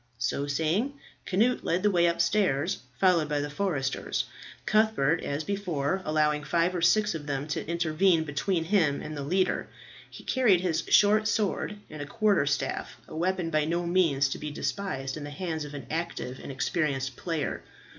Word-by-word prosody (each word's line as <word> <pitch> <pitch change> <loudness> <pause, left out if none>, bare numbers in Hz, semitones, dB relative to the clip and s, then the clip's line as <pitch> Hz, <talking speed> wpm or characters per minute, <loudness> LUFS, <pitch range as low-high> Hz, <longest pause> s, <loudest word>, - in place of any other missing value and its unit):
So 130 +4 -1
saying 165 - 0 0.3
Cnut 225 +7 +2
led 175 +3 0
the 210 - +4
way 175 -2 +4
upstairs, 170 -2 +1 0.2
followed 175 -5 +3
by 150 -1 0
the 145 0 -3
foresters, 150 -6 -1 0.4
Cuthbert, 215 -8 +2
as 145 +2 -2
before, 190 -3 -1
allowing 150 -1 +1
five 170 +4 +1
or 175 - -2
six 210 +5 +3
of 155 -2 -6
them 140 0 -2
to 150 - -2
intervene 170 +1 +2
between 160 +4 -1
him 165 -6 +2
and 155 - -6
the 145 - -4
leader. 185 +7 0 0.4
He - - -12
carried 220 -9 +3
his 175 -3 0
short 215 +1 +5
sword 210 -1 -1
and 155 -1 -8
a 145 - -5
quarterstaff, 185 -7 0
a - - -9
weapon 175 0 -1
by 155 -1 +2
no 170 +2 -1
means 165 -6 +3
to - - -4
be 150 - -4
despised 145 -4 -3
in 150 - -6
the 145 - -6
hands 160 -1 -4
of 145 0 -8
an 140 -4 -7
active 155 -5 -3
and - - -7
experienced 135 -1 -1
player. 165 -2 -3
165 Hz, 175 wpm, -28 LUFS, 145-190 Hz, 0.4 s, short